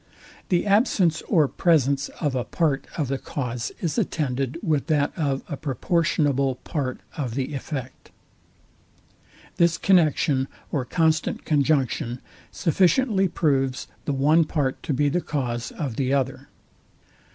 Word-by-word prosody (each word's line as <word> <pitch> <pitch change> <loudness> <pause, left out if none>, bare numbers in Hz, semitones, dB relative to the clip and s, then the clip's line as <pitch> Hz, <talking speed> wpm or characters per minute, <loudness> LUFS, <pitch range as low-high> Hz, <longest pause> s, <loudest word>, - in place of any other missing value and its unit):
The 175 -2 +2
absence 200 - +3
or 160 -8 +4
presence 140 -4 +2
of 145 -5 0
a 125 -2 -1
part 150 -2 0
of 150 -5 0
the 135 +1 -2
cause 125 -4 -4
is 170 +6 0
attended 140 - -1
with 155 -6 0
that 145 -3 +1
of 140 -5 -1
a 150 - -4
proportionable 145 -2 0
part 130 -1 -4 0.2
of 125 -6 -3
the 135 +2 -2
effect. 135 -2 -6 1.5
This 170 -1 +3
connexion 155 -7 +3 0.2
or 135 -5 -1
constant 160 +3 0
conjunction 135 -5 +1 0.3
sufficiently 195 - +2
proves 135 -6 0 0.2
the 145 - 0
one 150 +5 +4
part 145 -4 -1
to - - -4
be 145 +2 +2
the 175 +5 +1
cause 125 -7 -3
of 135 -8 -4
the 135 0 +1
other. 135 -1 -1
145 Hz, 130 wpm, -24 LUFS, 135-165 Hz, 1.5 s, or